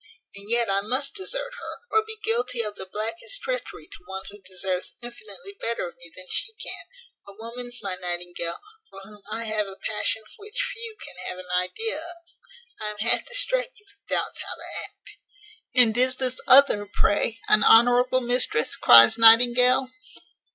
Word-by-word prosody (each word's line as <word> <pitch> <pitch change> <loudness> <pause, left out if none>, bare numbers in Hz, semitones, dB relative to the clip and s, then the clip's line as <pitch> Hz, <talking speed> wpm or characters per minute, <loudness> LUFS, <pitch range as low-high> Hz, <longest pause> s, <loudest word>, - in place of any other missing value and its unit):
and 200 +1 -8
yet 235 0 +1
I 195 0 0
must 260 +7 +1
desert - - -4
her, - - -7
or 440 0 +3
be 440 0 -8
guilty 245 +1 -1
of 210 -1 -3
the 190 - -9
blackest 345 - -3
treachery - - -5
to - - -15
one 190 0 -6
who 205 0 -14
deserves 185 -1 -4
infinitely 205 -5 -11
better 230 -5 -2
of 170 - -12
me 170 -1 -13
than 185 - -11
she 445 - -1
can; 455 +2 -6 0.4
a 200 - -12
woman, 235 +3 -9
my 195 -2 -3
Nightingale, 175 -1 -3 0.3
for - - -13
whom 205 +1 -15
I 230 - -3
have 215 -2 -2
a 195 - -9
passion 220 +2 -2
which 420 +2 -7
few 460 -2 -8
can - - -13
have - - -5
an 185 -1 -10
idea 185 - -1
of. 340 +2 -2 0.6
I 215 - -5
am 210 - -8
half 225 +3 0
distracted - - 0
with 405 0 -25
doubts - - -1
how - - -4
to - - -4
act." - - -15 0.6
"And 235 -4 +5
is 255 +1 +1
this 255 -1 -4
other, 255 -6 +6
pray, 220 +2 0
an 215 - +5
honourable 245 +2 +5
mistress?" 245 -10 +1
cries 120 - +7
Nightingale. 245 +3 +6
230 Hz, 175 wpm, -24 LUFS, 200-265 Hz, 0.6 s, cries